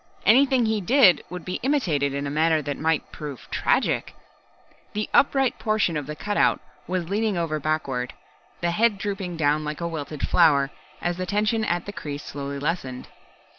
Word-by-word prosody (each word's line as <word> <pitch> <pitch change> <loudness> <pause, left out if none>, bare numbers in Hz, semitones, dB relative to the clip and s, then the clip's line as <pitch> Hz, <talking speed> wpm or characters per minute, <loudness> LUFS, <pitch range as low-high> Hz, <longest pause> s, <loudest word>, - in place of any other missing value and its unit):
Anything 260 +2 +5
he 220 -1 0
did 195 - +5
would 180 0 -7
be 180 - -3
imitated 175 - +1
in 140 +1 -3
a 140 - -3
manner 155 +1 +2
that 145 0 -3
might 160 0 0
prove 145 -4 -8
tragic. - - 0 0.8
The 210 0 -2
upright 270 -2 +3
portion 215 -6 +1
of 145 -2 -3
the 150 - -5
cutout 205 +6 +1 0.3
was 180 -2 -2
leaning 205 +1 0
over 160 -2 -1
backward, 135 -5 -2 0.5
the 170 0 +1
head 215 +3 +2
drooping 195 -3 -4
down 150 0 +2
like 150 0 -4
a 170 - -2
wilted 155 -3 -4
flower, 145 -5 +4 0.3
as 175 0 -1
the 185 0 -3
tension 215 +3 +1
at 175 -4 -1
the 205 - -6
crease 145 -5 -6
slowly 140 0 -5
lessened. 140 -4 -3
170 Hz, 170 wpm, -24 LUFS, 150-210 Hz, 0.8 s, Anything